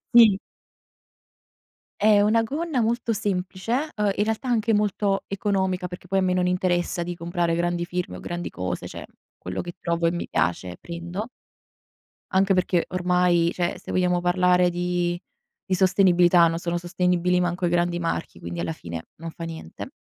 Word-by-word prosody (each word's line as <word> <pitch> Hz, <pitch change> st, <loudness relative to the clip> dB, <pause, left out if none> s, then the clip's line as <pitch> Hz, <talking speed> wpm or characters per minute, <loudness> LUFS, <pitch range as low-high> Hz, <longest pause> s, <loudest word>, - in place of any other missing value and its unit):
Sì. 220 Hz, -5 st, +8 dB, 1.7 s
È 210 Hz, -1 st, +6 dB
una 220 Hz, +2 st, +3 dB
gonna 290 Hz, +2 st, -2 dB
molto 230 Hz, +1 st, 0 dB
semplice, 205 Hz, -, -2 dB
uhm, 210 Hz, -1 st, +2 dB
in 205 Hz, -, +1 dB
realtà 220 Hz, +4 st, -2 dB
anche 230 Hz, -2 st, +2 dB
molto 205 Hz, -1 st, +1 dB
economica 190 Hz, -2 st, -1 dB
perché 180 Hz, 0 st, -9 dB
poi 195 Hz, +1 st, +1 dB
a -, -, 0 dB
me 185 Hz, -1 st, +2 dB
non 180 Hz, 0 st, +1 dB
interessa 180 Hz, -1 st, 0 dB
di 175 Hz, +1 st, -4 dB
comprare 170 Hz, 0 st, -1 dB
grandi 175 Hz, 0 st, 0 dB
firme 175 Hz, -, -4 dB
o -, -, -9 dB
grandi 175 Hz, 0 st, -4 dB
cose, 90 Hz, 0 st, -4 dB
cioè -, -, -8 dB, 0.3 s
quello 90 Hz, +1 st, -5 dB
che 175 Hz, -1 st, -6 dB
trovo 170 Hz, 0 st, 0 dB
e -, -, +3 dB
mi 175 Hz, -, -3 dB
piace 90 Hz, 0 st, -1 dB
prendo. 175 Hz, +6 st, -6 dB, 1.0 s
Anche 195 Hz, +1 st, +3 dB
perché 180 Hz, -1 st, +2 dB
ormai 180 Hz, -1 st, +2 dB
cioè 175 Hz, -1 st, -1 dB
se -, -, -10 dB
vogliamo 180 Hz, -1 st, +2 dB
parlare 180 Hz, 0 st, +3 dB
di 175 Hz, 0 st, -1 dB, 0.5 s
di 185 Hz, -, +4 dB
sostenibilità 180 Hz, -2 st, +5 dB
non 165 Hz, 0 st, -2 dB
sono 170 Hz, 0 st, -2 dB
sostenibili 180 Hz, 0 st, +1 dB
manco 180 Hz, +1 st, -1 dB
i -, -, +2 dB
grandi 175 Hz, 0 st, +1 dB
marchi, 170 Hz, -, -3 dB
quindi 85 Hz, 0 st, -6 dB
alla 85 Hz, -1 st, -2 dB
fine 85 Hz, 0 st, -7 dB
non 165 Hz, +1 st, -6 dB
fa 165 Hz, -, -8 dB
niente. 160 Hz, -, -8 dB
180 Hz, 170 wpm, -24 LUFS, 175-195 Hz, 1.7 s, Sì